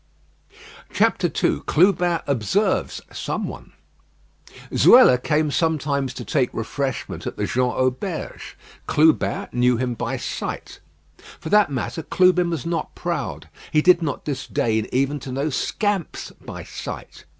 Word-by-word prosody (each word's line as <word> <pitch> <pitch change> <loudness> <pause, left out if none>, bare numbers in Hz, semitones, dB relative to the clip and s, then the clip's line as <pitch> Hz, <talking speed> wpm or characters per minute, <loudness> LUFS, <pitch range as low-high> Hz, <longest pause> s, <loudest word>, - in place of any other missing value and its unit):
II - - +2
CLUBIN 175 -1 +3
OBSERVES 140 - 0
SOMEONE - - -5 1.0
Zuela 235 - +7
came 150 0 +1
sometimes 140 -5 0
to - - -6
take 135 -5 +1
refreshment 130 +3 -3
at - - -5
the - - -1
Jean 125 0 +1
Auberge. 130 0 -3 0.3
Clubin 155 +1 +2
knew 125 0 +2
him 125 0 -1
by 115 - -3
sight. - - -5 0.6
For 160 - -6
that 210 -3 +5
matter 135 +5 -3
Clubin 180 +1 +3
was 165 -7 -3
not 170 0 -3
proud. - - -4 0.2
He 155 0 +3
did 180 -1 +6
not 145 -5 -3
disdain 115 -6 -1
even 135 +3 0
to 130 - -7
know 140 +4 -1
scamps 205 - -2
by - - -9
sight. - - -8
145 Hz, 125 wpm, -22 LUFS, 130-170 Hz, 1.0 s, Zuela